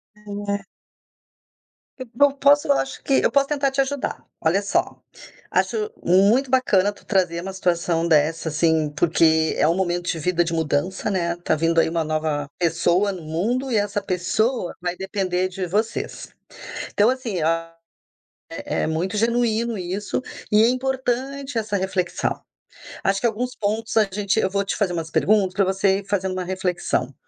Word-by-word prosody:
É. 205 Hz, -1 st, -4 dB, 1.3 s
Eu 255 Hz, -2 st, -7 dB
po 275 Hz, +4 st, +3 dB
posso, 285 Hz, +1 st, +4 dB
eu -, -, +5 dB
acho 135 Hz, 0 st, -3 dB
que 275 Hz, -, +3 dB
eu -, -, +3 dB
posso 280 Hz, -1 st, +3 dB
tentar 280 Hz, -2 st, +1 dB
te 270 Hz, +1 st, -4 dB
ajudar. 275 Hz, 0 st, -3 dB, 0.2 s
Olha 170 Hz, +5 st, +2 dB
só, 200 Hz, -, -1 dB, 0.5 s
acho 435 Hz, -1 st, 0 dB
muito 205 Hz, +9 st, +4 dB
bacana 205 Hz, -6 st, +3 dB
tu -, -, -19 dB
trazer 180 Hz, -4 st, +1 dB
uma 190 Hz, +1 st, -6 dB
situação 170 Hz, -2 st, 0 dB
dessa 160 Hz, +1 st, +2 dB
assim, 160 Hz, 0 st, +2 dB
porque 160 Hz, 0 st, +3 dB
é 150 Hz, -, +3 dB
um 165 Hz, -, +2 dB
momento 175 Hz, -2 st, -1 dB
de 165 Hz, -, -1 dB
vida, 175 Hz, +2 st, +1 dB
de 165 Hz, 0 st, -3 dB
mudança, 165 Hz, +5 st, -1 dB
né 170 Hz, -2 st, 0 dB
tá 175 Hz, -2 st, 0 dB
vindo 165 Hz, +1 st, +2 dB
aí -, -, +3 dB
uma 165 Hz, 0 st, 0 dB
nova 155 Hz, -2 st, -1 dB
pessoa 175 Hz, +3 st, +2 dB
no 180 Hz, -3 st, -7 dB
mundo 225 Hz, -, -2 dB
e -, -, +1 dB
essa 205 Hz, 0 st, 0 dB
pessoa 190 Hz, +4 st, -1 dB
vai 175 Hz, 0 st, -2 dB
depender 185 Hz, -1 st, -1 dB
de 185 Hz, -1 st, -4 dB
vocês. 215 Hz, +5 st, -3 dB, 0.6 s
Então, 210 Hz, +4 st, +4 dB
assim, 235 Hz, -9 st, -3 dB
a 165 Hz, +1 st, 0 dB, 1.0 s
é -, -, -1 dB
é -, -, 0 dB
muito 175 Hz, +6 st, -2 dB
genuíno 230 Hz, 0 st, +1 dB
isso 190 Hz, +7 st, -3 dB, 0.3 s
e 210 Hz, +1 st, +6 dB
é 235 Hz, -, +5 dB
importante 265 Hz, +1 st, -2 dB
essa 215 Hz, -2 st, -1 dB
reflexão. 185 Hz, -1 st, -2 dB, 0.6 s
Acho 195 Hz, 0 st, +2 dB
que -, -, +1 dB
alguns 245 Hz, +3 st, -2 dB
pontos 220 Hz, +2 st, -2 dB
a 215 Hz, -, +5 dB
gente 205 Hz, +2 st, 0 dB
eu 190 Hz, -, +1 dB
vou 200 Hz, 0 st, 0 dB
te 195 Hz, -, -2 dB
fazer 185 Hz, -4 st, 0 dB
umas 165 Hz, -1 st, -4 dB
perguntas 200 Hz, -3 st, +2 dB
pra 195 Hz, 0 st, +1 dB
você 190 Hz, 0 st, +2 dB
ir 200 Hz, -, -8 dB
fazendo 190 Hz, -2 st, -1 dB
uma 185 Hz, -1 st, -3 dB
reflexão. 185 Hz, -1 st, -2 dB
190 Hz, 170 wpm, -22 LUFS, 170-225 Hz, 1.3 s, e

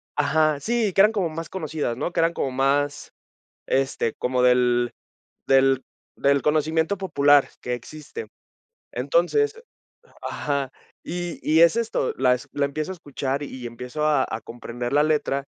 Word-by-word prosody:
ajá, 150 Hz, 0 st, +2 dB
sí, 225 Hz, -1 st, 0 dB
que 195 Hz, -, +5 dB
eran 210 Hz, +2 st, +6 dB
como 195 Hz, -6 st, -1 dB
más 160 Hz, 0 st, -6 dB
conocidas, 155 Hz, -9 st, -3 dB
¿no? 175 Hz, -, -3 dB
Que 170 Hz, -, +1 dB
eran 165 Hz, +1 st, +2 dB
como 135 Hz, -, -2 dB
más, 140 Hz, +2 st, 0 dB, 0.6 s
este, 135 Hz, -4 st, 0 dB
como 125 Hz, 0 st, -1 dB
del 125 Hz, -1 st, +3 dB, 0.6 s
del 135 Hz, -1 st, +4 dB, 0.3 s
del 140 Hz, 0 st, +2 dB
conocimiento 160 Hz, +4 st, +1 dB
popular 145 Hz, -7 st, +4 dB
que 125 Hz, -, -2 dB
existe. 155 Hz, -, -8 dB, 0.6 s
Entonces 445 Hz, -3 st, +1 dB, 0.6 s
ajá, 140 Hz, -2 st, -2 dB, 0.3 s
y 175 Hz, 0 st, -5 dB
y 160 Hz, +1 st, +3 dB
es 170 Hz, +6 st, +6 dB
esto, 230 Hz, -, -1 dB
la 125 Hz, -1 st, +3 dB
la 145 Hz, -, 0 dB
empiezo 150 Hz, +4 st, -3 dB
a -, -, -6 dB
escuchar, 140 Hz, -4 st, -3 dB
y 130 Hz, -3 st, -7 dB
empiezo 125 Hz, +6 st, -4 dB
a 145 Hz, -3 st, +3 dB
a 110 Hz, -, -3 dB
comprender 120 Hz, +2 st, -6 dB
la 145 Hz, -, +5 dB
letra, 150 Hz, -3 st, 0 dB
145 Hz, 150 wpm, -24 LUFS, 130-165 Hz, 0.6 s, eran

